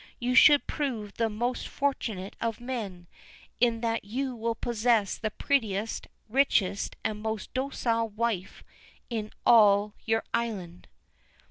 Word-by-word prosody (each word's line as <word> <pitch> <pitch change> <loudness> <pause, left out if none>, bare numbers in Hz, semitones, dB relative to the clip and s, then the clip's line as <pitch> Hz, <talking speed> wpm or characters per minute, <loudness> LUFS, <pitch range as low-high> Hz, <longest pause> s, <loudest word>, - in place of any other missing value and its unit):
You 245 +1 -1
should 290 +3 +7
prove 235 -9 -3
the 230 -1 0
most 240 +4 -2
fortunate 220 -9 -2
of 230 -2 -2
men, 220 -8 -5 0.5
in 235 -2 +2
that 230 -1 -1
you 255 +5 -3
will 230 0 -2
possess 230 -3 +1
the 220 - -3
prettiest, 220 -4 -1 0.2
richest, 215 -6 +1
and 215 -1 -2
most 220 -2 -4
docile 240 -4 0
wife 215 -3 -3 0.5
in 215 -2 -3
all 210 -2 +6
your 225 0 +1
island." 200 -7 -3
225 Hz, 125 wpm, -28 LUFS, 210-240 Hz, 0.5 s, should